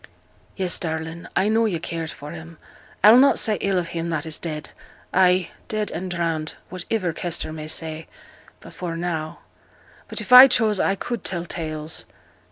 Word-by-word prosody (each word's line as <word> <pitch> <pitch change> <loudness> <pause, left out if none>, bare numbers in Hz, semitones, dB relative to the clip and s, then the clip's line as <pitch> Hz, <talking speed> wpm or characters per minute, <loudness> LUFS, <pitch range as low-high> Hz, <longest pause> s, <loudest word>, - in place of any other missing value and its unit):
'Yes, 185 -3 -1
darling, 160 0 -5
I 195 - +2
knew 225 +1 +3
yo' 185 -5 -1
cared 165 -1 -5
for 145 0 -8
him. 165 0 -10 0.5
I'll 220 +4 +9
not 275 +1 +5
say 215 -2 +2
ill 195 -1 +1
of 175 -2 -2
him 170 0 -3
that 155 -2 -2
is 160 -1 -5
dead 155 -3 -6 0.4
ay, 180 -1 +3 0.2
dead 215 -1 -2
and 185 +3 -5
drowned 165 -3 -2 0.2
whativer 185 0 -2
Kester 170 -2 -3
may 155 -1 -7
say 160 0 -3 0.5
before 170 -2 -6
now; 165 -2 -4 0.7
but - - -3
if 250 - -1
I 255 +2 +12
chose 220 -5 +2
I 195 - +2
could 240 +4 -5
tell 175 -2 -2
tales.' 155 -2 -5
170 Hz, 170 wpm, -23 LUFS, 160-195 Hz, 0.7 s, I